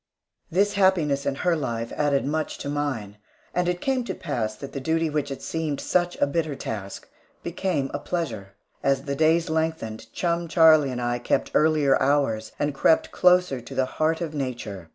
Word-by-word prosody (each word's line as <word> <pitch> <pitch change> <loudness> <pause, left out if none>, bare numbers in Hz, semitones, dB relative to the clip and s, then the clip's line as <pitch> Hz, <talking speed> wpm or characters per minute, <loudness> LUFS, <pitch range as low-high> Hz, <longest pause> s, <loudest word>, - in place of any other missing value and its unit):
This 200 +4 +2
happiness 170 -8 +2
in 140 - 0
her 175 -2 +4
life 115 -6 -3
added 145 -2 +1
much 155 +2 -2
to 140 - -5
mine, 130 -9 -3 0.4
and 180 0 +1
it 180 0 -2
came 265 -2 0
to - - -4
pass 115 -9 -3
that 135 +5 -9
the 140 - -3
duty 160 +3 0
which 150 -1 -1
had 135 - -6
seemed 160 -3 -2
such 175 0 0
a - - +4
bitter 155 0 -1
task, 100 -6 -6 0.4
became 170 -6 -2
a 145 - -2
pleasure. 115 - -4 0.3
As 135 -1 +1
the 140 0 -3
days 160 +2 +3
lengthened, 160 -9 -2
chum 170 +2 -1
Charlie 160 -3 +6
and 125 -1 -3
I 120 0 0
kept 120 - 0
earlier 150 -3 +3
hours, 130 -6 +1
and 145 0 -1
crept 150 +4 +3
closer 180 -8 +3
to 120 - -10
the 130 - +2
heart 155 +5 0
of 160 -3 -3
nature. 120 - -5
145 Hz, 185 wpm, -25 LUFS, 130-165 Hz, 0.4 s, Charlie